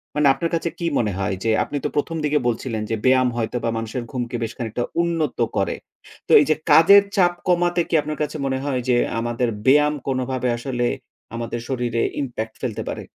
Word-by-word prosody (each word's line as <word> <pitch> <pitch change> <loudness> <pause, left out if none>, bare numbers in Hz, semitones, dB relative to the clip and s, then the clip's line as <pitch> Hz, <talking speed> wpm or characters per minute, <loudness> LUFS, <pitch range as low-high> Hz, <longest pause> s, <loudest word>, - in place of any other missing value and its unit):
মানে, 150 -1 +3
আপনার 170 +4 -2
কাছে 165 +1 -1
কী 170 - -3
মনে 110 -3 +1
হয় 95 0 -1
যে, 115 - +2
আপনি 145 - -4
তো - - +1
১ম 165 +3 -1
দিকে 150 0 +2
বলছিলেন 115 -1 -2
যে, 115 - 0
ব্যায়াম 130 -1 +4
হয়তোবা 115 +1 -2
মানুষের 115 +2 -4
ঘুমকে 120 -2 -3
বেশ 115 - -3
খানিকটা 115 0 -3 0.2
উন্নত 165 -5 -1 0.2
করে। 95 - 0 0.5
তো, - - -3
এইযে 155 +1 +2 0.2
কাজের 200 +5 +8
চাপ 175 -3 +4
কমাতে 175 -1 +2
কি - - -6
আপনার 155 +1 -5
কাছে 150 - -4
মনে 135 -1 0
হয় 130 -3 -1
যে, 125 - +4 0.2
আমাদের 120 +1 -1 0.2
ব্যায়াম 150 +2 +5
কোনোভাবে 130 -1 -1
আসলে 120 0 -2 0.5
আমাদের 115 0 -4
শরীরে 120 -3 -1 0.2
impact 115 -4 -5
ফেলতে 120 -5 -3
পারে? - - -5
130 Hz, 185 wpm, -22 LUFS, 120-150 Hz, 0.5 s, কাজের